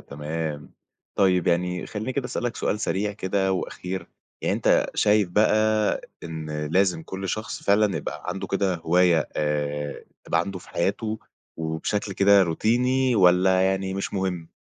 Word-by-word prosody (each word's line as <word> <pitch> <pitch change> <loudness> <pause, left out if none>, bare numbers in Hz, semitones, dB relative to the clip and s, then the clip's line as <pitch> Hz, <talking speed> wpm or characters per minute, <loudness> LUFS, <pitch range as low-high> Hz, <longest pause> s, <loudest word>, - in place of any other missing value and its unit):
تمام، 75 +1 -5 0.4
طيب 90 -3 +3
يعني 90 +1 0
خلّيني 110 +4 -4
كده 140 -2 -2
أسألك 120 -1 -3
سؤال 105 - -1
سريع 105 0 -1
كده 95 -1 0
وأخير، 95 0 -4 0.4
يعني - - +1
أنت - - +2
شايف 105 -2 +3
بقى 110 +2 +2 0.2
إن 80 -2 -4
لازم 90 +1 +1
كل 95 +3 -6
شخص 110 +4 -4
فعلًا 100 0 +3
يبقى - - -5
عنده 95 +1 -4
كده 95 0 0
هواية 85 -2 +2
آآ 75 -1 -2 0.2
تبقى - - +1
عنده 100 -2 -4
في 90 - -16
حياته 110 +5 -1 0.4
وبشكل 80 +6 -2
كده 100 +1 +5
روتيني 125 +9 +1
والّا 95 -1 +5
يعني 95 0 0
مش 100 +1 -4
مهم؟ 90 -4 -2
95 Hz, 145 wpm, -25 LUFS, 85-105 Hz, 0.4 s, كده